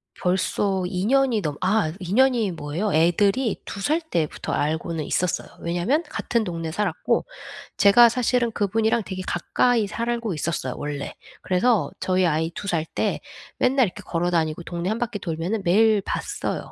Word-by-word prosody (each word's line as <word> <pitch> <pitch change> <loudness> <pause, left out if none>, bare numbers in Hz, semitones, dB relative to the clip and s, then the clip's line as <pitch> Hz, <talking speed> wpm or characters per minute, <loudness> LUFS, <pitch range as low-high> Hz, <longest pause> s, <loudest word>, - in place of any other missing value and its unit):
벌써 190 +1 0
2 185 +1 -2
년이 260 -3 +3
넘어 150 -4 -3
아 185 -4 +2
2 185 +1 -4
년이 245 -5 +3
뭐예요. 165 +6 -3
애들이 195 +8 +2
2 200 - -6
살 310 +9 +1
때부터 170 - -3
알고는 160 +1 -1
있었어요. 180 -1 -1
왜냐하면 175 - 0
같은 235 -2 -1
동네에 165 -4 -4
살았고 210 +5 0 0.5
제가 230 +4 +7
사실은 245 0 +1
그분이랑 220 +2 +1
되게 185 -1 -5
가까이 225 +5 +1
살고 235 0 -2
있었어요, 155 -4 -2
원래. 145 -1 -4 0.3
그래서 205 +4 +2
저희 185 0 +1
아이 160 0 0
2 200 - -6
살 165 -3 0
때 - - -2 0.4
맨날 260 -1 +3
이렇게 180 - -9
걸어 175 +1 -1
다니고 160 0 0
동네 175 +2 -3
1 220 - -1
바퀴 235 -3 -3
돌면은 175 +5 -2
매일 215 +4 +4
봤어요. - - -4
190 Hz, 325 characters per minute, -24 LUFS, 170-225 Hz, 0.5 s, 제가